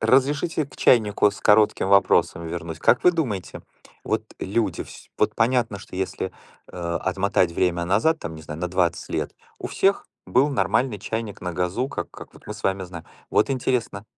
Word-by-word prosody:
разрешите 140 +7 +2
к 140 - -16
чайнику 105 -3 +4
с 100 - -11
коротким 105 -2 +4
вопросом 100 -3 +3
вернуть. 80 -1 -5
Как 125 - +3
вы 180 - +7
думаете, 115 - -3 0.4
вот - - 0 0.2
люди 100 -3 -1
вс - - -13
вот - - +2
понятно, 115 -3 +1
что 95 - -10
если, 95 0 -3 0.4
э, 85 -1 -3
отмотать 95 -2 +1
время 85 0 +1
назад, 115 - +2
там, 80 - -6
не 80 - -10
знаю, 75 +1 -7
на 90 - -1
20 90 -1 0
лет, - - -2 0.3
у - - -4
всех 195 +1 +1 0.2
был 135 +4 +3
нормальный 125 -4 +1
чайник 110 0 -4
на 90 - -3
газу, 90 +9 -1
как - - -5
как - - -12
вот - - -18
мы 105 - -5
с 105 - -11
вами 95 -1 0
знаем. 85 -2 -9 0.3
Вот 105 - +3
интересно 120 -5 -1
100 Hz, 180 wpm, -24 LUFS, 90-125 Hz, 0.4 s, вы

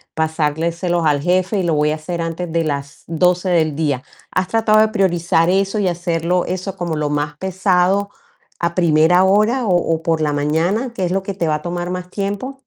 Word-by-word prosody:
pasárselos 165 +2 -1
al 145 -2 +2
jefe, 185 +4 +1
y - - 0
lo 165 -2 +1
voy 150 0 +2
a - - 0
hacer 170 +2 -5
antes 165 +1 -4
de 165 -1 0
las 140 -1 -4
12 180 +2 +1
del 160 -4 +2
día. 140 -5 -1 0.3
¿Has 185 0 -1
tratado 220 -1 +3
de 220 0 +4
priorizar 175 -4 +1
eso 195 +3 +1
y 195 - +1
hacerlo 175 0 0
eso 185 +1 -4
como 170 -4 -3
lo 150 -1 -1
más 150 0 -2
pesado, 190 +1 +1 0.5
a 170 0 -1
primera 170 +1 +4
hora 215 +6 +2
o 180 -3 +3 0.2
o 160 - -8
por 165 -1 +1
la 150 -1 0
mañana, 165 - 0
que 190 -5 -2
es 175 - -2
lo 195 0 -1
que 200 - -4
te 170 -4 -1
va 155 - +1
a 150 - -5
tomar 175 +1 -4
más 180 0 -5
tiempo? 205 +8 -4
175 Hz, 210 wpm, -18 LUFS, 160-190 Hz, 0.5 s, de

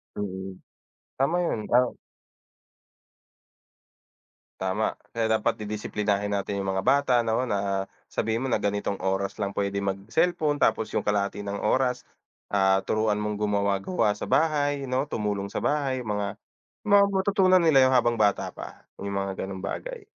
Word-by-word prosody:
Mm, 95 -2 -5 0.6
tama 140 +6 +2
yun, 110 - -1 0.2
ah 125 0 +3 2.7
Tama, 95 +3 0 0.2
kaya 115 -1 0
dapat - - +1
didisiplinahin 105 -1 -2
natin 100 0 -2
yung 95 0 -2
mga 95 - -1
bata 140 -2 +3
no 115 +3 0
na 100 -2 -1 0.2
sabihin 115 +3 -1
mo - - -1
na 110 - +2
ganitong 100 0 -1
oras 95 +2 -2
lang 100 -1 -2
pwede 100 0 -1
mag 95 -1 -1
cellphone 155 -5 +1
tapos 110 0 +1
yung - - -1
kalahati 100 0 0
ng 100 0 -4
oras, 125 +3 +1 0.5
ah, 95 -1 +3
turuan 110 -1 +1
mong 105 0 -2
gumawa-gawa 100 - +1
sa - - -5
bahay 145 -3 +2
no 130 +3 0
tumulong 105 -4 -2
sa - - -4
bahay 135 -4 0
mga 105 -1 -2 0.5
mga 205 -1 +6
matutunan 190 -1 +4
nila 140 -5 +6
yun - - +2
habang 120 -2 +3
bata 105 -2 +2
pa, - - -10 0.2
yung 100 0 -4
mga 95 -1 -2
ganung 95 -1 -7
bagay, - - -5
105 Hz, 150 wpm, -26 LUFS, 100-130 Hz, 2.7 s, mga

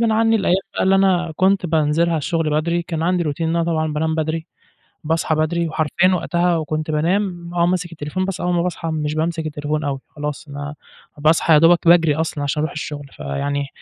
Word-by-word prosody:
غصبٍ 225 -1 +3
عني 225 0 +3
الأيام 190 -3 +2 0.2
بقى - - 0
اللي 190 +1 +4
أنا 185 -3 +2
كنت 190 -1 +2
بانزِلها 160 +1 +2
الشُّغل 160 +1 -1
بدري، 170 +2 -1
كان 165 -2 -4
عندي 180 0 +1
Routine - - -1
إن 165 - +1
أنا 170 - +1
طبعًا 160 -2 -1
بانام 160 +1 -1
بدري، 160 +1 -2 0.6
باصحى 160 0 0
بدري، 165 +2 0
وحرفيًا 165 +4 +2
وقتها 175 0 +1
وكنت 155 0 -3
بانام 175 +2 -1
آه، 170 0 +2
ماسك 180 -1 -1
التليفون، 165 +4 -3
بس 190 -1 -4
أول 180 0 0
ما 170 - +2
باصحى 170 -2 -3
مش 155 -1 -2
بامسك 160 0 -1
التليفون 150 +1 -3
أوي، 140 -2 -2
خلاص 150 +1 -6
أنا 145 +1 -6 0.4
باصحى 155 +2 +3
يا - - +8
دوبك 165 +2 +4
باجري 165 -4 +5
أصلًا 160 -2 -2
علشان 150 +2 -1
أروح 155 - -1
الشُّغل، 145 -1 -6
فيعني 140 - -3
165 Hz, 200 wpm, -20 LUFS, 150-175 Hz, 0.6 s, يا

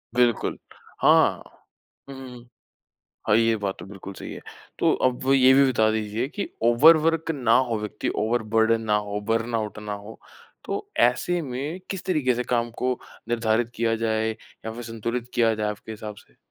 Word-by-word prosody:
बिल्कुल। 120 -2 +2 0.4
हाँ। - - +4 0.7
हुँ, 135 - -8
हुँ, 130 -1 -9
हुँ। 120 0 -14 0.8
हाँ, 105 - +5
ये 115 -1 +3
बात 100 -2 -3
तो 85 - -8
बिल्कुल 100 0 -9
सही - - -8
है, - - -9 0.4
तो - - +3 0.2
अब 130 +2 -3
ये 130 -1 +6
भी 140 0 +6
बता 110 -3 +3
दीजिए 110 +3 -2
कि 205 - -4 0.2
ओवर 140 +8 +7
वर्क 165 +1 0
ना 125 -4 +3
हो 115 -2 -1
व्यक्ति 105 - -4 0.2
ओवर 115 +1 0
बर्डन 115 0 +4
ना 105 -1 +2
हो, 105 0 -3
बर्नआउट 115 0 -2
ना 105 -1 -5
हो, 105 +2 -8 0.5
तो - - -4
ऐसे 130 +9 +2
में 140 +6 -4
किस 190 -3 -4
तरीके 145 -9 +1
से 125 +1 -2
काम 120 -1 0
को 125 -1 0 0.3
निर्धारित 115 0 +1
किया 115 0 +1
जाए 110 0 0
या 110 0 -9
फिर 120 +1 -7
संतुलित 115 +2 -4
किया 115 -2 +3
जाए 105 -1 -1
आपके 105 +1 -8
हिसाब 105 -1 -7
से? - - -30
115 Hz, 180 wpm, -24 LUFS, 110-125 Hz, 0.8 s, ओवर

